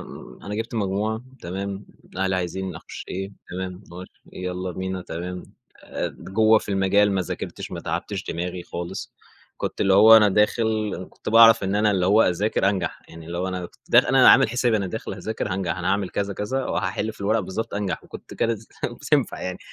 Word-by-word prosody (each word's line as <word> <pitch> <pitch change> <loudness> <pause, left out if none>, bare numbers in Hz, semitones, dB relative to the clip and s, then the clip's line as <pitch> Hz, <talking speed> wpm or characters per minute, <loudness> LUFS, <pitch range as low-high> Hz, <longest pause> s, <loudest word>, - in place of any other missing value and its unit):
إمم - - -11
أنا 105 - -5
جِبت 115 +2 -4
مجموع 105 +2 -1 0.2
تمام، 95 +3 -5 0.3
أهلي 95 0 +1
عايزين 90 +1 -3
أخش - - -9
إيه 95 +2 -5 0.2
تمام، 90 +1 -5
معرفش 90 +1 -11
يالّا 90 0 -4
بينا 95 +1 -4
تمام، 90 +2 -6 0.4
آآ - - -3
د - - -14
جوّه 110 +3 +4
في - - -12
المجال 100 +1 +3
ما 95 - +1
ذاكرتش، - - -6
ما - - -5
تعبتش - - -4
دماغي 90 +1 -4
خالص، 85 0 -6 0.5
كنت - - -3
اللي 95 - +4
هو 110 +3 +9
أنا 105 -2 +6
داخل 110 +1 +1
إن 90 +2 -7
كنت - - -9
باعرف 115 -1 +7
إن 95 +1 -1
أنا 105 +1 +3
اللي 95 -3 +1
هو 105 +4 +5
أذاكر 100 +3 +1
أنجح، 95 -4 -2
يعني 80 -1 -11
اللي 85 +1 -5
هو 95 +1 -1
أنا 90 -1 -4
كنت - - -26
داخ - - +7
أنا - - +6
عامل - - +6
حسابي 120 -1 +1
أنا 100 -3 -1
داخل 110 +4 -5
هاذاكر 110 -2 -4
هانجح، 90 -2 -2
أنا 90 - -2
هاعمل 100 -1 0
كذا، 100 0 -2
كذا، 130 +7 -2
وهاحل 100 +2 -2
في 105 - -19
الورقة 110 +3 +2
بالضبط، 105 +4 -4
أنجح 100 -2 -3
وكنت - - -11
كانت 115 -2 0 0.2
بتنفع - - 0
يعني. 90 0 -4
95 Hz, 200 wpm, -24 LUFS, 90-110 Hz, 0.5 s, هو